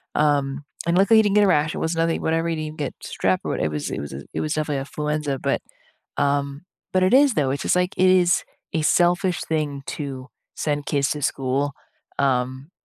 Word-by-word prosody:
Um, 145 -1 +1 0.2
and, 170 +1 +2
luckily, 210 +3 +6
he - - +5
didn't 205 0 +1
get 210 - +6
a - - +3
rash, 155 -3 +2
it - - -3
was 165 +1 -1
nothing 165 0 0
whatever, 165 +1 0
he 165 - 0
didn't 155 0 -5
get 145 - -3
strep, - - 0
or - - -1
what - - -2
it 80 - 0
was 75 -1 -3
it - - -3
was 70 -1 -7
a 70 +1 -7
it - - -2
was 155 0 -1
definitely 150 -2 -1
influenza. 150 0 -2
But, - - 0 0.6
um 140 +1 0 0.3
but 185 0 +3
it 185 - +3
is, 275 -2 +5
though, 135 -3 +1
it's 140 - -3
just, - - +2
like, 180 0 +1
it 185 0 +5
is 180 -1 +4 0.3
a 160 - +1
selfish 175 +2 +2
thing 150 -3 -2
to 135 -3 -5 0.3
send 145 -1 -2
kids 140 -2 +1
to 150 - -3
school, 140 +1 -1 0.5
um, 130 +2 0
150 Hz, 220 wpm, -23 LUFS, 140-170 Hz, 0.6 s, luckily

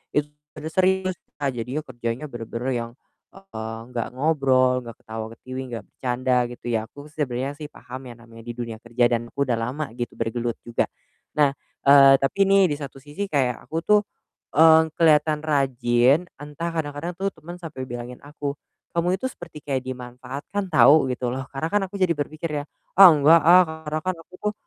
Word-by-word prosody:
itu 150 0 +1 0.3
mode 155 +1 -6
serius, 185 0 +2 0.3
a 140 -2 +1
jadinya 125 +5 -4
kerjanya 120 +2 -4
benar-benar 120 -1 -5
yang, 115 -1 -3 0.4
eee, 115 -13 -7 0.2
nggak 115 -2 -2
ngobrol, 130 -3 +2
nggak 115 -2 -10
ketawa-ketiwi, 115 +4 -6
nggak 115 -3 -5
bercanda, 125 0 -1
gitu 120 - -12
ya. 115 - +2
Aku 145 0 -12
sebenernya 135 -3 -2
sih 150 0 -8
paham 130 -2 -10
ya 120 - -8
namanya 115 -1 -14
di 120 +1 -7
dunia 115 -2 -5
kerja 120 +1 +1
dan 120 0 -1
aku 140 - -1
udah 120 -3 0
lama, 130 +7 -3
gitu, 120 0 -5
bergelut 115 0 -2
juga. 120 - -1 0.5
Nah, 145 -2 +4 0.3
eee, 140 -1 +8
tapi 135 +8 -2
nih 195 -1 +5
di - - -2
satu 140 -1 -7
sisi 150 +9 -6
kayak 130 -5 +1
aku 160 - -3
tuh, 210 0 +5 0.6
eee, 160 0 +7
kelihatan 155 -2 +4
rajin, 135 0 +2 0.2
entah 150 +3 -5
kadang-kadang 160 +2 -3
tuh 195 +1 0
temen 170 +3 -10
sampai 155 -7 -7
bilangin 120 +1 -7
aku, 145 -1 -5 0.4
"Kamu 175 +2 +1
itu 225 - -5
seperti 155 - -8
kayak 135 -3 -1
dimanfaatkan, 130 +9 -6
tau." 155 -3 +6
Gitu 125 0 -3
loh. 130 - -3
Karena 140 +4 -3
kan 205 - +3
aku 200 - -7
jadi 185 -3 +2
berpikir 155 +2 -4
ya, - - -8 0.3
"Ah, 195 -1 +10
enggak, 160 +1 +6
ah." 175 +4 +8 0.3
Karena 155 - -1
kan 185 0 0
aku 175 - -25
tuh, 210 +2 -2
140 Hz, 180 wpm, -24 LUFS, 120-160 Hz, 0.6 s, Ah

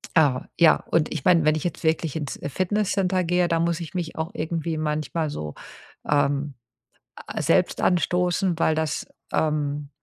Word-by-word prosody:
Ah, 140 -6 +3
ja, 170 -2 +7 0.2
und 160 -2 +2
ich - - -4
meine, 170 -4 +4
wenn 155 0 +4
ich 155 - -3
jetzt 175 -2 -4
wirklich 160 -2 +1
ins, 150 -3 -4
äh, 145 - -5
Fitnesscenter 185 +1 0
gehe, 175 +1 +2
da 165 -1 +1
muss 170 0 0
ich 165 +1 -7
mich 170 -3 -4
auch 160 +1 -3
irgendwie 160 0 -2
manchmal 155 +1 -1
so, 75 - -5 0.6
ähm, 145 -1 +1 0.6
a - - -6
selbst - - +2
anstoßen, 180 0 +1
weil 160 -1 +2
das, 160 -1 -2 0.3
ähm, 150 -2 -1
160 Hz, 170 wpm, -24 LUFS, 150-175 Hz, 0.6 s, ja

